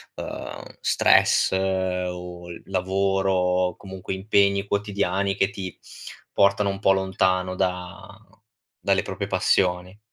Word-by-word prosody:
ehm, -, -, -8 dB
stress, -, -, +4 dB
o 90 Hz, -2 st, -2 dB, 0.2 s
lavoro, 95 Hz, +1 st, 0 dB
o 90 Hz, -1 st, +1 dB
comunque 95 Hz, -1 st, -7 dB
impegni 100 Hz, 0 st, +2 dB
quotidiani 100 Hz, -1 st, -1 dB
che 95 Hz, 0 st, +2 dB
ti 95 Hz, -2 st, -7 dB, 0.5 s
portano 100 Hz, +1 st, +3 dB
un 100 Hz, 0 st, -4 dB
po' 95 Hz, -, +4 dB
lontano 95 Hz, -1 st, +1 dB
da 95 Hz, +3 st, -4 dB, 0.6 s
dalle 100 Hz, -2 st, +2 dB
proprie 100 Hz, 0 st, -5 dB
passioni. 90 Hz, 0 st, +1 dB
95 Hz, 105 wpm, -24 LUFS, 90-100 Hz, 0.6 s, stress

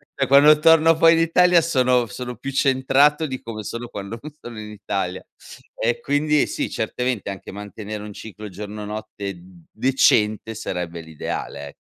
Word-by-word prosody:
cioè 135 Hz, -1 st, 0 dB
quando 145 Hz, +3 st, +7 dB
torno 165 Hz, 0 st, +6 dB
poi 165 Hz, +1 st, +6 dB
in 165 Hz, -, +2 dB
Italia 175 Hz, +1 st, +4 dB
sono 125 Hz, -6 st, +2 dB
sono 125 Hz, +3 st, -7 dB
più 135 Hz, +4 st, -6 dB
centrato 135 Hz, +3 st, +3 dB
di 130 Hz, -4 st, -5 dB
come 110 Hz, -2 st, -7 dB
sono 115 Hz, +3 st, -6 dB
quando 100 Hz, +3 st, -7 dB
non 155 Hz, -, -9 dB
sono 120 Hz, -2 st, -9 dB
in 105 Hz, 0 st, -8 dB
Italia 100 Hz, -3 st, -4 dB, 0.5 s
e 120 Hz, +1 st, -1 dB
quindi 150 Hz, +1 st, +1 dB
sì, -, -, -3 dB
certamente 125 Hz, -1 st, -2 dB
anche 100 Hz, -1 st, -7 dB
mantenere 105 Hz, +1 st, -7 dB
un 105 Hz, -1 st, -8 dB
ciclo 105 Hz, 0 st, -9 dB
giorno 105 Hz, +2 st, -7 dB
notte 105 Hz, -2 st, -6 dB
d 90 Hz, -1 st, -17 dB
decente 110 Hz, -3 st, +2 dB
sarebbe 90 Hz, -5 st, -5 dB
l'ideale, 75 Hz, -2 st, -6 dB
ecco. -, -, -12 dB
115 Hz, 165 wpm, -22 LUFS, 105-140 Hz, 0.5 s, quando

